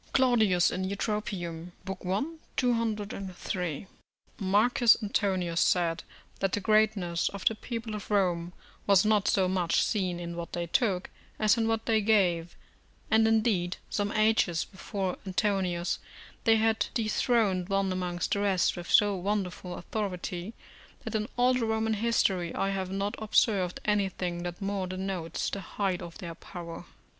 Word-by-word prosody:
Claudius 220 Hz, -9 st, +4 dB
in 185 Hz, -, -2 dB
Eutrop., 210 Hz, +2 st, -2 dB
i. 180 Hz, +3 st, -4 dB, 0.3 s
203.] 200 Hz, -, -2 dB, 0.5 s
Marcus 215 Hz, +4 st, +4 dB
Antonius 185 Hz, -5 st, 0 dB
said, 170 Hz, -2 st, +2 dB, 0.4 s
that 195 Hz, -1 st, 0 dB
the -, -, +1 dB
greatness 205 Hz, -5 st, +2 dB
of 200 Hz, -1 st, -8 dB
the -, -, +4 dB
people 230 Hz, 0 st, -5 dB
of 210 Hz, -, -6 dB
Rome 180 Hz, -4 st, +1 dB, 0.4 s
was 200 Hz, 0 st, +5 dB
not 210 Hz, -2 st, +3 dB
so 190 Hz, -2 st, +3 dB
much 180 Hz, -2 st, +2 dB
seen 185 Hz, -5 st, -1 dB
in 170 Hz, 0 st, -5 dB
what 170 Hz, 0 st, -6 dB
they 175 Hz, 0 st, -2 dB
took, 190 Hz, 0 st, 0 dB, 0.3 s
as 215 Hz, 0 st, +4 dB
in 225 Hz, -2 st, 0 dB
what 225 Hz, 0 st, 0 dB
they 220 Hz, -2 st, +3 dB
gave; 180 Hz, -6 st, +2 dB, 0.6 s
and, 220 Hz, 0 st, +5 dB
indeed, 215 Hz, -6 st, +1 dB
some 205 Hz, -1 st, 0 dB
ages 215 Hz, -6 st, +2 dB
before 190 Hz, -1 st, -4 dB
Antonius, 185 Hz, -2 st, 0 dB, 0.5 s
they 225 Hz, -, +6 dB
had 220 Hz, 0 st, +2 dB
dethroned 215 Hz, -5 st, +1 dB
one 195 Hz, -1 st, +1 dB
amongst 180 Hz, -1 st, -2 dB
the 200 Hz, -, +2 dB
rest 195 Hz, -3 st, +2 dB
with 175 Hz, -1 st, -7 dB
so 205 Hz, -1 st, +5 dB
wonderful 185 Hz, -2 st, -3 dB
authority, 185 Hz, 0 st, -4 dB, 0.5 s
that -, -, -5 dB
in 215 Hz, -1 st, -1 dB
all 250 Hz, +1 st, +4 dB
the 250 Hz, -2 st, 0 dB
Roman 220 Hz, 0 st, +1 dB
history 200 Hz, -6 st, +1 dB
I 195 Hz, -, 0 dB
have 190 Hz, -1 st, -2 dB
not 195 Hz, +2 st, -2 dB
observed 205 Hz, -4 st, +2 dB
anything 190 Hz, -4 st, 0 dB
that 175 Hz, +2 st, -5 dB
more 195 Hz, -1 st, -1 dB
denotes 185 Hz, -2 st, -3 dB
the 200 Hz, -, -4 dB
height 190 Hz, -2 st, -2 dB
of 170 Hz, -1 st, -8 dB
their 175 Hz, -5 st, -6 dB
power. 170 Hz, 0 st, -9 dB
195 Hz, 145 wpm, -29 LUFS, 180-215 Hz, 0.6 s, they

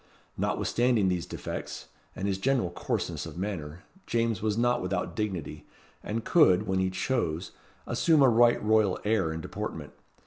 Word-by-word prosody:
Notwithstanding 120 Hz, -5 st, +1 dB
these 90 Hz, -2 st, -2 dB
defects, -, -, -6 dB, 0.3 s
and 95 Hz, -, -3 dB
his 95 Hz, -1 st, -1 dB
general 125 Hz, -6 st, +1 dB
coarseness -, -, -3 dB
of -, -, -9 dB
manner, 90 Hz, -3 st, -5 dB, 0.2 s
James 115 Hz, -3 st, 0 dB
was 110 Hz, 0 st, 0 dB
not 120 Hz, +1 st, +2 dB
without 90 Hz, -2 st, -2 dB
dignity, 95 Hz, -6 st, -4 dB, 0.3 s
and 115 Hz, +1 st, -4 dB
could, 110 Hz, -, +5 dB
when 95 Hz, -2 st, 0 dB
he 95 Hz, 0 st, +1 dB
chose, 95 Hz, -3 st, -2 dB, 0.3 s
assume 160 Hz, -4 st, +3 dB
a -, -, +7 dB
right 120 Hz, 0 st, +5 dB
royal 105 Hz, -3 st, +3 dB
air 105 Hz, -6 st, +2 dB
and 80 Hz, 0 st, -5 dB
deportment. -, -, -6 dB
105 Hz, 150 wpm, -28 LUFS, 90-115 Hz, 0.3 s, a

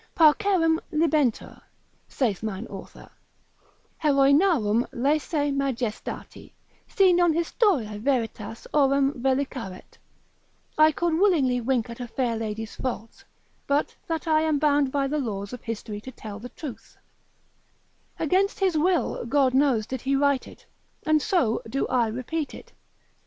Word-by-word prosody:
Parcerem 325 Hz, 0 st, +4 dB
libenter 305 Hz, -6 st, 0 dB, 0.5 s
(saith 225 Hz, -9 st, -1 dB
mine 215 Hz, 0 st, -4 dB
author) -, -, -11 dB, 1.0 s
Heroinarum 275 Hz, -, +4 dB
laesae 290 Hz, +3 st, 0 dB
majestati, 260 Hz, -5 st, -4 dB, 0.3 s
si 385 Hz, -4 st, +4 dB
non 350 Hz, -1 st, +4 dB
historiae 325 Hz, -, +1 dB
veritas 225 Hz, -3 st, -2 dB
aurem 275 Hz, -1 st, +3 dB
vellicaret, 260 Hz, -7 st, -3 dB, 0.8 s
I 310 Hz, 0 st, +6 dB
could 340 Hz, +1 st, -1 dB
willingly 315 Hz, -9 st, +3 dB
wink 245 Hz, -1 st, 0 dB
at 235 Hz, -, -9 dB
a 245 Hz, -, -5 dB
fair 240 Hz, 0 st, -1 dB
lady's 220 Hz, 0 st, -5 dB
faults, 230 Hz, -3 st, -5 dB, 0.4 s
but 285 Hz, +2 st, 0 dB
that 325 Hz, -1 st, -3 dB
I 310 Hz, -1 st, +3 dB
am 315 Hz, -2 st, +1 dB
bound 290 Hz, -2 st, +2 dB
by 280 Hz, 0 st, 0 dB
the 300 Hz, +2 st, -1 dB
laws 200 Hz, -5 st, -4 dB
of 250 Hz, -, -7 dB
history 215 Hz, -2 st, -6 dB
to 260 Hz, -, -9 dB
tell 215 Hz, -4 st, -9 dB
the 245 Hz, +3 st, -8 dB
truth: 280 Hz, -4 st, -9 dB, 1.2 s
against 380 Hz, +7 st, +1 dB
his 380 Hz, -4 st, +2 dB
will, 345 Hz, +3 st, +1 dB
God 270 Hz, 0 st, +2 dB
knows, 260 Hz, -5 st, +3 dB
did 260 Hz, +1 st, -5 dB
he 275 Hz, +1 st, 0 dB
write 280 Hz, -1 st, +1 dB
it, -, -, -15 dB, 0.4 s
and 310 Hz, -1 st, +3 dB
so 325 Hz, -, +1 dB
do 275 Hz, +4 st, -1 dB
I 245 Hz, -3 st, +2 dB
repeat 255 Hz, +7 st, -4 dB
it. -, -, -13 dB
275 Hz, 135 wpm, -25 LUFS, 235-310 Hz, 1.2 s, I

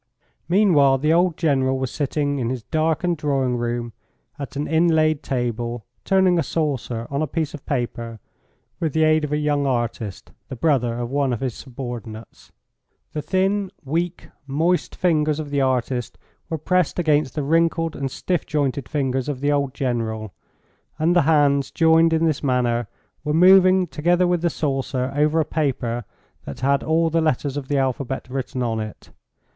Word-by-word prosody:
Meanwhile 165 Hz, -9 st, +4 dB
the 150 Hz, +4 st, +2 dB
old 175 Hz, -1 st, +2 dB
General 135 Hz, -5 st, +1 dB
was 130 Hz, -1 st, -3 dB
sitting 145 Hz, -1 st, -1 dB
in 120 Hz, -2 st, -1 dB
his 125 Hz, -3 st, -4 dB
darkened 160 Hz, +3 st, 0 dB
drawing 135 Hz, -4 st, 0 dB
room 120 Hz, -1 st, -3 dB, 0.5 s
at 140 Hz, 0 st, -6 dB
an 145 Hz, +1 st, -2 dB
inlaid 160 Hz, -1 st, +3 dB
table, 120 Hz, -3 st, -3 dB, 0.2 s
turning 190 Hz, -3 st, +3 dB
a -, -, +3 dB
saucer 135 Hz, -7 st, -2 dB
on 140 Hz, +1 st, -1 dB
a 155 Hz, -, 0 dB
piece 160 Hz, +1 st, -2 dB
of 150 Hz, -, -10 dB
paper 120 Hz, -4 st, -3 dB, 0.6 s
with 160 Hz, -5 st, -1 dB
the 160 Hz, -, +2 dB
aid 155 Hz, 0 st, +3 dB
of 150 Hz, -, -3 dB
a 150 Hz, -, +1 dB
young 145 Hz, -1 st, 0 dB
artist, 115 Hz, -5 st, -3 dB, 0.2 s
the -, -, -5 dB
brother 125 Hz, -5 st, +1 dB
of 120 Hz, 0 st, -4 dB
one 140 Hz, -2 st, +1 dB
of 120 Hz, -, -2 dB
his 130 Hz, -2 st, -2 dB
subordinates. 120 Hz, -4 st, -8 dB, 0.6 s
The 150 Hz, -, -2 dB
thin, 190 Hz, +4 st, 0 dB, 0.2 s
weak, 170 Hz, +5 st, -2 dB, 0.2 s
moist 165 Hz, +6 st, 0 dB
fingers 155 Hz, -4 st, +1 dB
of 150 Hz, -2 st, -5 dB
the 140 Hz, -1 st, +1 dB
artist 125 Hz, -2 st, -1 dB, 0.3 s
were 160 Hz, -, -2 dB
pressed 180 Hz, +2 st, 0 dB
against 150 Hz, -6 st, +1 dB
the 150 Hz, -, -1 dB
wrinkled 165 Hz, +2 st, +1 dB
and 135 Hz, -1 st, -3 dB
stiff 175 Hz, +5 st, -2 dB
jointed 140 Hz, -4 st, -1 dB
fingers 135 Hz, -2 st, -1 dB
of 140 Hz, -3 st, -3 dB
the 145 Hz, +2 st, +1 dB
old 140 Hz, -2 st, 0 dB
General, 110 Hz, -, -2 dB, 0.6 s
and 165 Hz, +3 st, +2 dB
the 175 Hz, -, +6 dB
hands 140 Hz, -3 st, +3 dB
joined 165 Hz, 0 st, +4 dB
in 165 Hz, 0 st, +2 dB
this 155 Hz, -3 st, 0 dB
manner 120 Hz, -4 st, 0 dB, 0.4 s
were 150 Hz, 0 st, 0 dB
moving 185 Hz, +1 st, +6 dB
together 175 Hz, +2 st, +1 dB
with 175 Hz, -1 st, +1 dB
the 170 Hz, -, +2 dB
saucer 135 Hz, -4 st, -2 dB
over 150 Hz, +2 st, +2 dB
a 155 Hz, -, +2 dB
paper 125 Hz, -7 st, -2 dB, 0.4 s
that 70 Hz, -, -8 dB
had 140 Hz, +1 st, +2 dB
all 165 Hz, +1 st, +1 dB
the 165 Hz, +1 st, +2 dB
letters 145 Hz, -2 st, 0 dB
of 145 Hz, -2 st, -4 dB
the 145 Hz, -, 0 dB
alphabet 135 Hz, 0 st, -2 dB
written 130 Hz, -1 st, -3 dB
on 115 Hz, -2 st, -1 dB
it. 110 Hz, -1 st, -8 dB
145 Hz, 175 wpm, -22 LUFS, 130-160 Hz, 0.6 s, the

